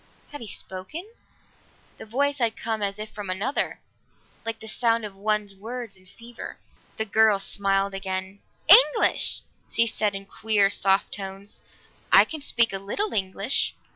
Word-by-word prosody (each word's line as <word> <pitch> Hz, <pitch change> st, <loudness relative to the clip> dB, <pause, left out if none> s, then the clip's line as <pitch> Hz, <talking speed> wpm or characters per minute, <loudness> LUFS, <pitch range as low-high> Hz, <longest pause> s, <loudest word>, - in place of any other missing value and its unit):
Had 290 Hz, -, -8 dB
he 230 Hz, -, -7 dB
spoken? 195 Hz, -, -6 dB, 0.9 s
The -, -, -9 dB
voice 280 Hz, +5 st, 0 dB
had 230 Hz, -2 st, 0 dB
come 220 Hz, -1 st, -3 dB
as 200 Hz, 0 st, -1 dB
if 215 Hz, 0 st, -5 dB
from 205 Hz, -3 st, -7 dB
another, 205 Hz, +10 st, -1 dB, 0.6 s
like 225 Hz, -1 st, -4 dB
the 220 Hz, -, -10 dB
sound 230 Hz, 0 st, 0 dB
of 200 Hz, -2 st, -8 dB
one's 210 Hz, 0 st, -1 dB
words 225 Hz, +2 st, -7 dB
in 185 Hz, 0 st, -13 dB
fever. 235 Hz, +4 st, -10 dB, 0.4 s
The 220 Hz, -, -1 dB
girl 220 Hz, 0 st, +4 dB
smiled 195 Hz, 0 st, 0 dB
again. 190 Hz, 0 st, -4 dB, 0.3 s
"English!" -, -, +6 dB, 0.3 s
she 230 Hz, -, +3 dB
said 215 Hz, -3 st, -1 dB
in 195 Hz, 0 st, -6 dB
queer 205 Hz, -1 st, +2 dB
soft 195 Hz, 0 st, +2 dB
tones. 195 Hz, 0 st, -6 dB, 0.5 s
"I -, -, +8 dB
can 315 Hz, -2 st, -6 dB
speak 235 Hz, -6 st, +3 dB
a 195 Hz, -, -3 dB
little 300 Hz, -, -2 dB
English." 195 Hz, +5 st, -1 dB
210 Hz, 155 wpm, -25 LUFS, 195-230 Hz, 0.9 s, I